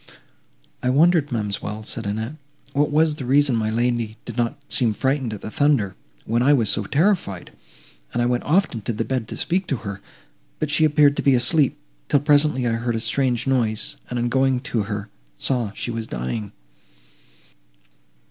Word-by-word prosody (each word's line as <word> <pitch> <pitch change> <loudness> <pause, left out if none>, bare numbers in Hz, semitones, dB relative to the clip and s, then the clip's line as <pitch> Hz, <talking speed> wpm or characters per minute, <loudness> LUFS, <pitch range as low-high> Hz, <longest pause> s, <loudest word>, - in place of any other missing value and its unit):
"I 125 - 0
wondered, 155 +2 +3
ma'amselle," 105 -1 -3
said 110 0 -3
Annette, 110 +6 -3 0.4
"what 145 +1 +2
was 155 +1 +3
the 135 - -5
reason 140 0 +3
my 110 -1 0
lady 115 -1 -1
did - - -7
not 120 -1 -1
seem 115 -8 +1
frightened 130 -1 0
at 105 - -7
the 110 - -7
thunder, 135 -10 +1 0.3
when 115 +2 +1
I 140 +4 +5
was 115 -7 +3
so 105 - 0
terrified, 150 - 0 0.6
and - - -2
I 120 - +2
went 125 0 +1
often 160 - +1
to 115 - -3
the 115 +1 -2
bed 130 -4 -2
to - - -6
speak 185 +1 -1
to 140 - 0
her, 100 -1 -5 0.6
but 155 -1 -2
she 155 +1 +3
appeared 145 -1 +4
to - - +1
be 140 -2 +4
asleep; 140 +3 +3 0.3
till 145 - +3
presently 145 -3 +3
I 120 - +1
heard 120 -1 -1
a - - -1
strange 125 0 +1
noise, 120 -5 0
and, 125 - -3
on 120 0 0
going 130 0 +2
to 115 - +1
her, 105 -1 -4 0.3
saw 120 - 0
she 120 - -4
was 115 -1 -4
dying." 95 - -4
125 Hz, 185 wpm, -22 LUFS, 110-145 Hz, 0.6 s, I